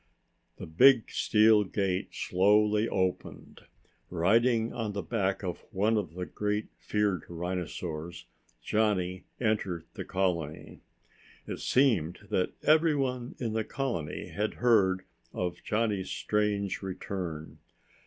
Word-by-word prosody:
The -, -, -7 dB
big 125 Hz, +9 st, +5 dB
steel 110 Hz, -1 st, +4 dB
gate 95 Hz, -1 st, -1 dB
slowly 105 Hz, +3 st, +3 dB
opened. 95 Hz, -1 st, -3 dB, 0.4 s
Riding 115 Hz, +6 st, +2 dB
on 110 Hz, -3 st, -3 dB
the 100 Hz, -, -3 dB
back 100 Hz, -4 st, -1 dB
of 90 Hz, -2 st, -3 dB
one 105 Hz, +4 st, +2 dB
of 90 Hz, -6 st, -2 dB
the 90 Hz, 0 st, -3 dB
greatly 105 Hz, +2 st, -2 dB
feared 105 Hz, -3 st, 0 dB
rhinosaurs, 85 Hz, -2 st, -5 dB, 0.4 s
Johnny 95 Hz, -4 st, 0 dB
entered 105 Hz, -7 st, -1 dB
the -, -, -5 dB
colony. 85 Hz, -5 st, -2 dB, 0.7 s
It -, -, -5 dB
seemed 105 Hz, -, +2 dB
that 90 Hz, -, 0 dB
everyone 140 Hz, -6 st, +2 dB
in 115 Hz, -3 st, -3 dB
the 110 Hz, 0 st, 0 dB
colony 115 Hz, -, -4 dB
had 105 Hz, +1 st, -2 dB
heard 95 Hz, -6 st, +3 dB, 0.3 s
of 90 Hz, -1 st, -3 dB
Johnny's 105 Hz, -3 st, -1 dB
strange 105 Hz, -2 st, -1 dB
return. 90 Hz, -4 st, -5 dB
100 Hz, 115 wpm, -29 LUFS, 90-110 Hz, 0.7 s, big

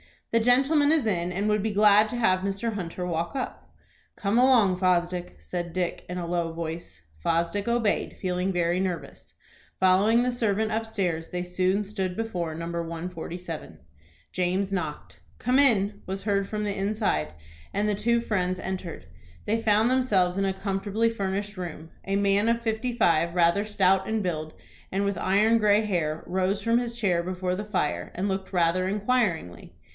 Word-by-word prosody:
"The 230 Hz, -, +4 dB
gentleman 275 Hz, +6 st, +4 dB
is 310 Hz, -7 st, +2 dB
in, 180 Hz, -4 st, 0 dB
and 195 Hz, +4 st, -1 dB
would 210 Hz, -1 st, +2 dB
be 215 Hz, +1 st, -1 dB
glad 210 Hz, +1 st, +6 dB
to 245 Hz, -, -4 dB
have 185 Hz, -6 st, +3 dB
Mr. 195 Hz, +4 st, -2 dB
Hunter 180 Hz, -2 st, -4 dB
walk 170 Hz, +4 st, -2 dB
up." 260 Hz, -, -5 dB, 0.5 s
"Come 210 Hz, +3 st, +1 dB
along, 235 Hz, -8 st, +5 dB
Fosdick," 180 Hz, -1 st, 0 dB
said 175 Hz, -2 st, -5 dB
Dick, 180 Hz, -1 st, -2 dB
in 180 Hz, -, -4 dB
a 175 Hz, -, -3 dB
low 170 Hz, -1 st, -1 dB
voice. 165 Hz, -, -6 dB, 0.2 s
Fosdick 170 Hz, -, 0 dB
obeyed, 235 Hz, -3 st, 0 dB
feeling 185 Hz, 0 st, -1 dB
very 175 Hz, 0 st, +1 dB
nervous. 185 Hz, -3 st, -4 dB, 0.5 s
Following 200 Hz, +6 st, +4 dB
the 250 Hz, -, +1 dB
servant 220 Hz, -2 st, 0 dB
upstairs, 200 Hz, -7 st, -2 dB
they 180 Hz, 0 st, -3 dB
soon 185 Hz, +3 st, 0 dB
stood 190 Hz, -3 st, -3 dB
before 180 Hz, -8 st, -3 dB
No. 165 Hz, +1 st, -5 dB
147. 170 Hz, +1 st, -5 dB, 0.5 s
James 185 Hz, +2 st, 0 dB
knocked. 160 Hz, -6 st, -4 dB, 0.2 s
"Come 250 Hz, +3 st, +2 dB
in," 210 Hz, -7 st, +3 dB
was 190 Hz, +1 st, -4 dB
heard 200 Hz, -1 st, 0 dB
from 210 Hz, 0 st, -3 dB
the 205 Hz, -1 st, -2 dB
inside, 195 Hz, -, -1 dB, 0.4 s
and 205 Hz, +2 st, 0 dB
the 210 Hz, -, +1 dB
two 235 Hz, +3 st, +1 dB
friends 185 Hz, -5 st, -1 dB
entered. 185 Hz, -2 st, -5 dB, 0.4 s
They 225 Hz, +2 st, 0 dB
found 220 Hz, +1 st, +3 dB
themselves 200 Hz, -9 st, +2 dB
in 195 Hz, -, +1 dB
a 190 Hz, -, 0 dB
comfortably 200 Hz, +3 st, -1 dB
furnished 200 Hz, -1 st, -3 dB
room. 165 Hz, -3 st, -7 dB
A 195 Hz, -, -1 dB
man 200 Hz, +1 st, +2 dB
of 230 Hz, 0 st, +2 dB
fifty 230 Hz, +2 st, -1 dB
five, 170 Hz, -6 st, +2 dB
rather 175 Hz, +4 st, +3 dB
stout 190 Hz, -2 st, +2 dB
in 220 Hz, 0 st, 0 dB
build, 155 Hz, -4 st, -3 dB, 0.4 s
and 195 Hz, +1 st, +1 dB
with 200 Hz, 0 st, -1 dB
iron 210 Hz, +4 st, +3 dB
gray 210 Hz, 0 st, +4 dB
hair, 165 Hz, -6 st, -1 dB
rose 190 Hz, +2 st, 0 dB
from 230 Hz, +1 st, +2 dB
his 235 Hz, -1 st, -4 dB
chair 185 Hz, -7 st, +1 dB
before 180 Hz, +1 st, -2 dB
the 205 Hz, +3 st, -3 dB
fire, 150 Hz, -7 st, -2 dB
and 195 Hz, +3 st, -1 dB
looked 190 Hz, 0 st, -4 dB
rather 180 Hz, +1 st, +2 dB
inquiringly. 200 Hz, -, -1 dB
195 Hz, 170 wpm, -26 LUFS, 180-215 Hz, 0.5 s, glad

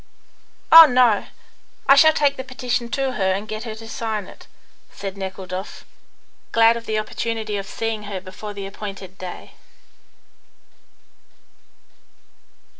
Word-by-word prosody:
"Oh, 325 Hz, 0 st, +12 dB
no. 245 Hz, -5 st, +3 dB, 0.6 s
I 275 Hz, -, +8 dB
shall 315 Hz, +3 st, +7 dB
take 285 Hz, -2 st, +1 dB
the 260 Hz, -, -6 dB
petition 250 Hz, -2 st, -3 dB
to 270 Hz, +1 st, -1 dB
her 195 Hz, -6 st, 0 dB
and 200 Hz, +3 st, -4 dB
get 215 Hz, +1 st, -6 dB
her 220 Hz, -2 st, -6 dB
to 225 Hz, 0 st, -11 dB
sign 220 Hz, -3 st, -4 dB
it," -, -, -15 dB, 0.4 s
said 195 Hz, -1 st, -7 dB
Nekhludoff, 190 Hz, 0 st, -7 dB, 0.7 s
glad 230 Hz, 0 st, +5 dB
of 230 Hz, 0 st, -8 dB
the 220 Hz, -, -1 dB
opportunity 220 Hz, 0 st, -3 dB
of 195 Hz, -1 st, -4 dB
seeing 225 Hz, -1 st, -4 dB
her 200 Hz, -2 st, -5 dB
before 200 Hz, +3 st, -9 dB
the 200 Hz, -1 st, -6 dB
appointed 195 Hz, -1 st, -8 dB
day. 185 Hz, -1 st, -8 dB
215 Hz, 130 wpm, -21 LUFS, 195-235 Hz, 0.7 s, Oh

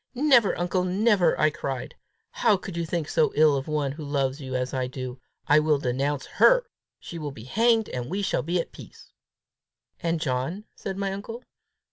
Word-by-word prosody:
"Never, 255 Hz, -6 st, +4 dB
uncle, 180 Hz, +1 st, 0 dB
never!" 190 Hz, -1 st, +2 dB
I 155 Hz, -, +4 dB
cried. 135 Hz, -4 st, -5 dB, 0.4 s
"How 220 Hz, -4 st, +3 dB
can 190 Hz, 0 st, -8 dB
you 170 Hz, -1 st, -3 dB
think 165 Hz, -2 st, -2 dB
so 155 Hz, -, +2 dB
ill 150 Hz, -1 st, +5 dB
of 135 Hz, -1 st, -3 dB
one 150 Hz, -3 st, -1 dB
who 150 Hz, +3 st, -8 dB
loves 140 Hz, -1 st, -1 dB
you 130 Hz, -1 st, -5 dB
as 125 Hz, 0 st, -2 dB
I 130 Hz, -1 st, -1 dB
do! 130 Hz, -1 st, -7 dB, 0.2 s
I 150 Hz, +1 st, +5 dB
will 150 Hz, -1 st, +2 dB
denounce 135 Hz, +2 st, -1 dB
her! -, -, +6 dB, 0.3 s
She 170 Hz, -, -8 dB
will 150 Hz, -2 st, -4 dB
be 125 Hz, -6 st, -10 dB
hanged, 225 Hz, -, +2 dB
and 125 Hz, 0 st, -4 dB
we 200 Hz, +4 st, -2 dB
shall 195 Hz, -, 0 dB
be 170 Hz, +3 st, -1 dB
at -, -, -4 dB
peace!" -, -, -14 dB, 0.9 s
"And 165 Hz, -1 st, -1 dB
John?" 140 Hz, +7 st, -2 dB
said 195 Hz, -1 st, -5 dB
my 195 Hz, -1 st, -2 dB
uncle. 225 Hz, +5 st, -7 dB
155 Hz, 190 wpm, -26 LUFS, 135-195 Hz, 0.9 s, her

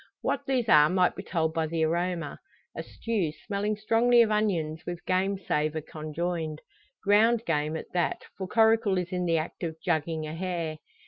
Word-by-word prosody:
What -, -, -2 dB
these 255 Hz, -4 st, +1 dB
are 150 Hz, -5 st, +7 dB
might 180 Hz, -1 st, +2 dB
be -, -, -5 dB
told 160 Hz, -4 st, -1 dB
by 160 Hz, -1 st, 0 dB
the 160 Hz, 0 st, -1 dB
aroma; 170 Hz, -2 st, -2 dB, 0.4 s
a -, -, -3 dB
stew, 210 Hz, -9 st, -2 dB
smelling 210 Hz, +1 st, -1 dB
strongly 235 Hz, +3 st, +4 dB
of 220 Hz, -, -1 dB
onions 170 Hz, -7 st, 0 dB
with 175 Hz, -1 st, -6 dB
game 190 Hz, +2 st, +1 dB
savour 155 Hz, -4 st, -1 dB
conjoined. 155 Hz, 0 st, -4 dB, 0.4 s
Ground 220 Hz, +3 st, +4 dB
game 155 Hz, -2 st, 0 dB
at -, -, -9 dB
that, 175 Hz, -1 st, 0 dB
for 190 Hz, -, -5 dB
Coracle 220 Hz, -1 st, +3 dB
is 180 Hz, 0 st, -2 dB
in 180 Hz, -1 st, -1 dB
the 165 Hz, -1 st, +2 dB
act 155 Hz, +2 st, -4 dB
of 165 Hz, -3 st, -3 dB
"jugging" 160 Hz, -2 st, -1 dB
a 155 Hz, -, -6 dB
hare. 165 Hz, -3 st, -3 dB
175 Hz, 180 wpm, -28 LUFS, 160-205 Hz, 0.4 s, are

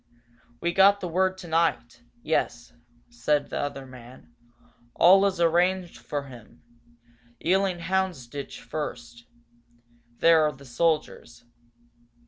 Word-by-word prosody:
"We 170 Hz, 0 st, -1 dB
got 200 Hz, +2 st, +5 dB
the 180 Hz, -, -4 dB
word 185 Hz, +2 st, 0 dB
tonight 160 Hz, -10 st, -1 dB, 0.2 s
yes," 120 Hz, 0 st, -2 dB, 0.4 s
said 140 Hz, +5 st, -1 dB
the -, -, -3 dB
other 140 Hz, -1 st, -4 dB
man. 125 Hz, -1 st, -14 dB, 0.6 s
"All 195 Hz, +3 st, +6 dB
is 190 Hz, -3 st, -3 dB
arranged 175 Hz, +2 st, +1 dB
for 145 Hz, -1 st, -4 dB
him. 120 Hz, -4 st, -15 dB, 0.8 s
Ealing 190 Hz, +1 st, +2 dB
Houndsditch, 170 Hz, -7 st, -3 dB
first. 120 Hz, -2 st, -7 dB, 0.9 s
There 165 Hz, -1 st, +5 dB
are 150 Hz, -1 st, +1 dB
the 140 Hz, +1 st, -16 dB
soldiers. 135 Hz, -3 st, -2 dB
155 Hz, 110 wpm, -26 LUFS, 125-180 Hz, 0.9 s, All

